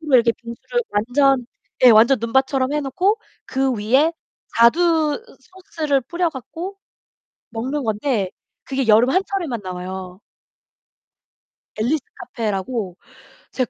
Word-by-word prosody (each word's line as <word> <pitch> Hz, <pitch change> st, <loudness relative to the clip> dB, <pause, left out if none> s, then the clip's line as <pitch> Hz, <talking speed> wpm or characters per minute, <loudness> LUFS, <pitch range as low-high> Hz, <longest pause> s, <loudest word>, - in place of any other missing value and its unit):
이렇게 250 Hz, -6 st, +4 dB
빙수를 235 Hz, -, -4 dB
완전 250 Hz, +3 st, +2 dB, 0.3 s
네. 255 Hz, -, +8 dB
완전 235 Hz, +4 st, +6 dB
눈밭처럼 265 Hz, +3 st, +1 dB
해 300 Hz, -, 0 dB
놓고 365 Hz, -, 0 dB, 0.3 s
그 265 Hz, 0 st, 0 dB
위에 255 Hz, +9 st, +2 dB, 0.4 s
자두 315 Hz, -, +3 dB, 0.2 s
소스를 330 Hz, -7 st, -2 dB
뿌려 345 Hz, +6 st, -1 dB
갖고 325 Hz, +8 st, -7 dB, 0.7 s
먹는 260 Hz, +6 st, -3 dB
건데 220 Hz, -2 st, -1 dB, 0.4 s
그게 265 Hz, -2 st, -2 dB
여름 225 Hz, +3 st, +5 dB
한철에만 360 Hz, -, -1 dB
나와요. 185 Hz, +1 st, -7 dB, 1.6 s
앨리스 250 Hz, +7 st, 0 dB
카페라고 210 Hz, -3 st, -4 dB, 0.6 s
제가 255 Hz, -2 st, -1 dB
260 Hz, 235 characters per minute, -21 LUFS, 225-300 Hz, 1.6 s, 네